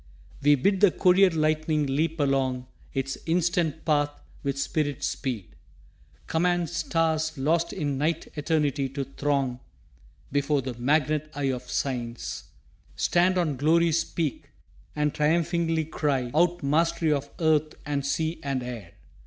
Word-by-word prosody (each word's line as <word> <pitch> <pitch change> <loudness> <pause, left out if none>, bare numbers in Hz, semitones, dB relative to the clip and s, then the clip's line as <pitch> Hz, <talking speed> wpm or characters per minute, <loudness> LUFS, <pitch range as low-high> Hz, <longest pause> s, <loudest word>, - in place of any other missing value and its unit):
We 145 +1 +6
bid 190 +8 +1
the 205 - +8
courier 185 +2 +5
lightning 155 -1 +1
leap 155 +4 -1
along 135 -3 +1 0.3
Its 135 0 -3
instant 165 -2 0
path 145 -2 +2 0.3
with 140 -1 -2
spirit 145 -1 -1
speed 120 -8 -3 0.7
command 175 0 +1
Stars 160 -2 0
lost 165 +5 +1
in 145 -7 -2
night 160 +2 0
eternity 150 -3 0
to 140 +1 -3
throng 135 -2 -1 0.7
Before 140 0 +1
the 130 -1 -4
magnet 150 +4 +1
eye 140 -2 0
of 125 -1 -6
Science 120 -3 -3 0.5
stand 180 +2 +2
On 155 -6 0
Glory's 165 +3 +3
peak 160 -5 -3 0.5
and 150 -1 0
triumphingly 165 +1 +1
cry 135 -5 -1
Out 175 +2 +2
mastery 165 +2 +2
of 140 0 -3
earth 155 -2 +2
and 145 -1 -1
sea 160 +4 -1
and 135 -3 -2
air. 115 -8 -7
150 Hz, 130 wpm, -26 LUFS, 135-165 Hz, 0.7 s, the